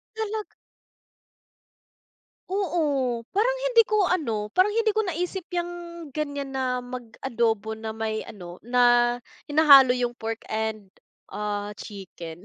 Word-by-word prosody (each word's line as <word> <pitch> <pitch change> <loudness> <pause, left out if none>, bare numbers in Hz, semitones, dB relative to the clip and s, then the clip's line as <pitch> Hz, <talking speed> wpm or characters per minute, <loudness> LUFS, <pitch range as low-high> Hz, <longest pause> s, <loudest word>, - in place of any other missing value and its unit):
Talaga 440 -1 -3 2.0
Oo, 300 - 0
parang 475 +5 +2
hindi - - +3
ko 425 -2 +3
ano, 225 -13 -1
parang 370 - +4
hindi 450 -2 +3
ko 435 - +1
naisip 360 -1 -3
'yang 350 -1 -2 0.4
gan'yan 285 -2 -3
na 255 -2 -1
mag-adobo 235 -3 -2
na 220 0 -6
may 220 -1 -2
ano, 180 -3 -10
na 240 0 +4 0.3
hinahalo 280 -4 +7
'yung 245 -1 0
pork 225 -1 -5
and, 215 -3 -3 0.4
ah, 205 0 -3
chicken. 185 -5 -9
250 Hz, 115 wpm, -25 LUFS, 220-350 Hz, 2.0 s, hinahalo